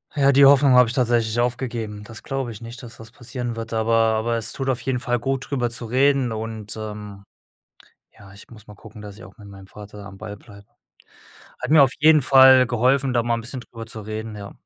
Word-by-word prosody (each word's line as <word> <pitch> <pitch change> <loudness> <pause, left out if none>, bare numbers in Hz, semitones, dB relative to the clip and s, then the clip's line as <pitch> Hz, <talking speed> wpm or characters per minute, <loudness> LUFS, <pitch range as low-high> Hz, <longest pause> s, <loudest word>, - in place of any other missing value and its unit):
Ja, 140 -1 +3
die 140 +1 +5
Hoffnung 140 -1 +5
habe 125 -2 +5
ich - - -4
tatsächlich 120 -2 0
aufgegeben. 115 -4 -3
Das 115 +1 -11
glaube 135 -3 -4
ich 105 - -10
nicht, 115 +1 -10
dass 115 -1 -12
das 115 0 -13
passieren 120 -1 -6
wird, 115 0 -7
aber 115 0 -1
aber 115 +1 +1
es 115 -1 -4
tut 135 -1 -5
auf 130 -1 -1
jeden 130 -2 -2
Fall 120 -1 -2
gut, 135 +2 -3
drüber 125 -4 -1
zu 120 0 -5
reden 130 0 +1
und, 110 -1 -7
ähm, 105 -2 -8 1.0
ja, 100 -1 -15
ich 100 - -16
muss 110 -2 -15
mal 105 - -13
gucken, 105 0 -14
dass 105 -1 -10
ich 115 - -14
auch - - -15
mit 100 - -14
meinem 95 -1 -14
Vater 105 -1 -12
am 95 -1 -12
Ball 105 -1 -8
bleibe. 100 -1 -17 1.0
Hat 135 - -4
mir 155 -2 +7
auf 130 -2 +3
jeden 155 0 +5
Fall 130 0 +6
geholfen, 130 +3 +1
da 120 -1 +1
mal 120 0 0
'n - - -6
bisschen 125 +2 -7
drüber 115 -1 -11
zu 110 -1 -8
reden, 110 +1 -7
ja. 100 -1 -9
115 Hz, 230 wpm, -22 LUFS, 110-130 Hz, 1.0 s, mir